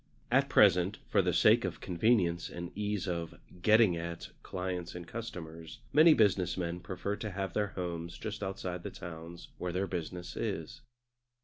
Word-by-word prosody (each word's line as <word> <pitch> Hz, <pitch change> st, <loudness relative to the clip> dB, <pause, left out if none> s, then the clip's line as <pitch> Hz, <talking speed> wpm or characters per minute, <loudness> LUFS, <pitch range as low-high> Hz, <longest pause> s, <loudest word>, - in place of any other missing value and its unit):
At 135 Hz, +2 st, +4 dB
present, 95 Hz, -3 st, +5 dB
for -, -, +4 dB
the -, -, +1 dB
sake -, -, +5 dB
of -, -, -3 dB
convenience 90 Hz, -2 st, +1 dB
and 85 Hz, 0 st, -6 dB
ease 105 Hz, -1 st, -2 dB
of 85 Hz, -2 st, -3 dB, 0.3 s
"getting 110 Hz, -2 st, +5 dB
at" 85 Hz, 0 st, -5 dB
clients 90 Hz, -2 st, -4 dB
and 85 Hz, -1 st, -7 dB
customers, 85 Hz, -8 st, -7 dB, 0.2 s
many 155 Hz, +2 st, +8 dB
business 95 Hz, -5 st, +3 dB
men 85 Hz, -1 st, -2 dB
prefer 95 Hz, +2 st, -3 dB
to 110 Hz, 0 st, -4 dB
have 95 Hz, -2 st, -3 dB
their 105 Hz, -1 st, +1 dB
homes 85 Hz, -1 st, -4 dB
just 110 Hz, -1 st, -5 dB
outside 95 Hz, -2 st, -4 dB
the -, -, -5 dB
towns 85 Hz, 0 st, -9 dB
where 90 Hz, -, -2 dB
their 95 Hz, +3 st, 0 dB
business 90 Hz, -1 st, -5 dB
is. -, -, -4 dB
90 Hz, 165 wpm, -32 LUFS, 85-105 Hz, 0.3 s, many